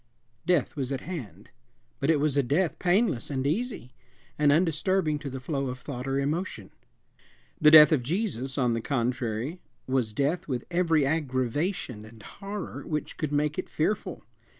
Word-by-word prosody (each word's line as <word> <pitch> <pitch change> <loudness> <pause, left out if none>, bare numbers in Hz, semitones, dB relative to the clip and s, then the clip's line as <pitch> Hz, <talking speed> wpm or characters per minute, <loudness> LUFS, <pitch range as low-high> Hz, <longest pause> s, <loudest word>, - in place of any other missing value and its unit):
Death 175 -7 +2
was 135 -3 -3
at 135 - -2
hand; 110 - -8 0.5
but 140 - 0
it 160 -3 +4
was 145 -1 +1
a 140 - +4
death 150 +7 0
painless 180 - +1
and 135 -2 -2
easy, 180 - -2 0.4
and 145 -1 +4
undisturbing 165 0 +1
to 145 -1 -5
the 130 0 -6
flow 135 +1 -2
of 125 0 -4
thought 125 0 -6
or 135 0 0
emotion. 155 +7 -2 0.9
The 150 - +8
death 150 -1 +10
of 150 -5 +3
Jesus, 135 - -2
on 125 -4 +2
the 115 - -1
contrary, 125 +3 -2 0.3
was 130 -4 0
death 145 +9 0
with 125 -4 -3
every 165 -4 +3
aggravation 135 - -1
and 110 -1 -14
horror 200 -1 -7
which 150 -1 -3
could 155 -2 -2
make 150 +2 0
it - - -4
fearful. 200 +7 -2
145 Hz, 165 wpm, -27 LUFS, 130-165 Hz, 0.9 s, death